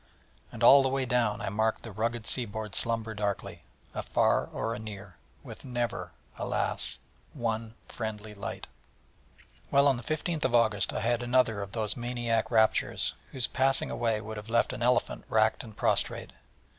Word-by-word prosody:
And 115 -1 -5
all 140 +4 +9
the 135 - +1
way 135 0 0
down 120 -4 +1
I - - -2
marked 110 +2 0
the 115 - -7
rugged 115 +2 -2
sea 125 +1 +3
board 105 -1 -6
slumber 115 -1 -1
darkling, 105 -2 -3 0.3
afar - - +1
or 115 +1 -2
near, 100 -3 -8 0.3
with - - -10
never, 120 -2 -3 0.3
alas! - - -2 0.4
one 115 -1 -2
friendly 110 -2 -5
light. 100 - -6 1.0
Well, 140 +1 +5
on 135 -3 +3
the 120 - -8
15th 155 -1 -1
August 110 -5 +3
I - - -3
had 120 +1 +1
another 120 -4 +2
of 100 0 -7
those 110 -2 0
maniac 120 -2 -1
raptures, 110 -2 +3 0.2
whose 130 -3 0
passing 135 +1 +2
away 115 -2 0
would 110 0 -7
have 105 +1 -8
left 115 +1 +2
an - - -6
elephant 125 0 +1
racked 110 0 +2
and 110 -3 -12
prostrate. - - 0
115 Hz, 160 wpm, -29 LUFS, 110-120 Hz, 1.0 s, all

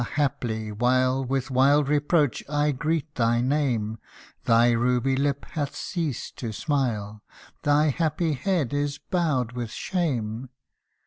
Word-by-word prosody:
haply, 115 -6 -1
while 130 +4 +2
With 135 +1 -2
wild 140 +3 +4
reproach 145 -2 +2
I 150 0 +2
greet 155 +2 -2
thy 120 -2 +2
name, 120 -5 0 0.5
Thy 120 +1 +5
ruby 125 +2 +2
lip 140 +1 0
hath 150 -3 -3
ceased 160 -8 -4
to 115 -3 -4
smile 110 -6 -2 0.4
Thy 150 +1 +3
happy 160 +2 0
head 145 -1 -1
is 145 0 -1
bowed 155 - -1
with 120 -2 -4
shame 125 - -2
135 Hz, 125 wpm, -25 LUFS, 120-150 Hz, 0.5 s, Thy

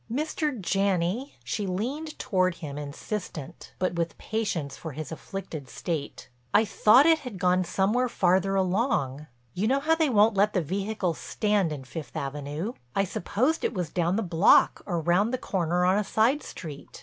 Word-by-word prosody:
"Mr. 300 0 -1
Janney," 195 +6 0
she 205 -3 -3
leaned 265 +12 -3
toward 185 -2 +1
him 150 -4 -7
insistent, 150 +1 -6
but 185 -1 0
with 170 -1 -2
patience 200 -10 -2
for 160 -3 -7
his 155 +1 -6
afflicted 160 -5 -7
state, 155 +1 -4 0.3
"I 220 - +6
thought 225 +6 +5
it 325 -1 +5
had 250 -9 -7
gone 180 0 +2
somewhere 210 +8 +1
farther 190 0 +2
along. 185 - 0 0.3
You 200 +4 0
know 270 +3 +3
how 310 +3 +2
they 320 -2 +2
won't 215 -1 +5
let 205 +2 +2
the 185 - +2
vehicles 195 0 -2
stand 205 -5 0
in 145 -3 -5
Fifth 135 +5 -8
Avenue. 145 - -4 0.2
I 195 - +3
supposed 255 - -1
it - - -1
was 180 -4 -2
down 175 +1 +1
the 225 - 0
block 175 0 +4
or 175 -4 0
round 180 +7 +2
the 255 - 0
corner 180 -4 0
on 190 +3 +4
a - - 0
side 230 +8 +2
street. 150 -4 -9
190 Hz, 175 wpm, -27 LUFS, 170-220 Hz, 0.3 s, I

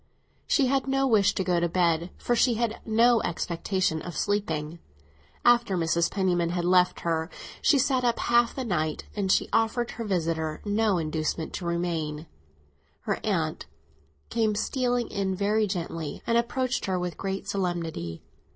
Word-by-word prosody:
She 280 - +3
had 270 +1 +1
no 270 0 +2
wish 215 -6 +3
to 190 - 0
go 180 -2 +1
to 170 0 0
bed, 170 -1 +1
for 240 - 0
she 240 0 +3
had 230 -1 -1
no 230 +1 +4
expectation 170 0 -1
of 175 -4 -7
sleeping. 170 -6 -1 0.7
After 240 -5 +4
Mrs. 170 0 +1
Penniman 175 -3 +1
had 175 0 -1
left 180 0 +3
her 165 0 -1 0.3
she 290 - +4
sat 260 -1 +2
up 240 -1 +2
half 240 0 +2
the 265 - -3
night, 155 -7 -1
and 195 -2 0
she - - +3
offered 225 +1 +1
her 230 - -5
visitor 165 -6 -1
no 205 -1 +2
inducement 155 0 -2
to 175 - -5
remain. 165 -3 -2 0.8
Her - - -2
aunt - - -1 0.6
came 220 -2 +1
stealing 245 +2 0
in 195 -1 -1
very 210 +2 +1
gently, 165 -5 -4
and 230 - +1
approached 255 +2 0
her 190 -1 0
with 180 -1 -3
great 195 0 -4
solemnity. 170 - -3
190 Hz, 160 wpm, -27 LUFS, 170-230 Hz, 0.8 s, no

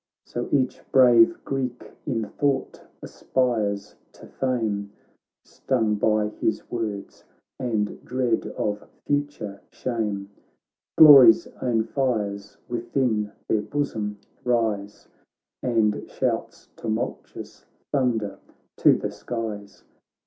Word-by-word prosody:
So 120 - -5
each 130 -3 +1
brave 130 +7 +6
Greek 130 -3 -4 0.2
in 115 -5 -1
thought 140 +5 -1 0.2
aspires 105 -6 -1 0.2
to - - -14
fame, 110 -6 -2 0.5
Stung 115 -5 0
by 105 0 +1
his 110 0 -2
words, 110 -4 -4 0.4
and 110 -5 -2
dread 125 -3 0
of 105 0 -3 0.2
future 145 -9 -2
shame; 105 -5 -3 0.7
Glory's 135 -7 +9 0.2
own 115 -3 +1
fires 105 -6 -2
within 120 -3 -1 0.2
their 110 - +1
bosom 110 -6 -3 0.3
rise, 110 -4 -1 0.5
And 110 -4 0
shouts - - -3
tumultuous 110 -2 -5 0.3
thunder 115 -7 0 0.4
to - - +6
the - - -4
skies. 110 -4 -6
115 Hz, 95 wpm, -24 LUFS, 105-125 Hz, 0.7 s, Glory's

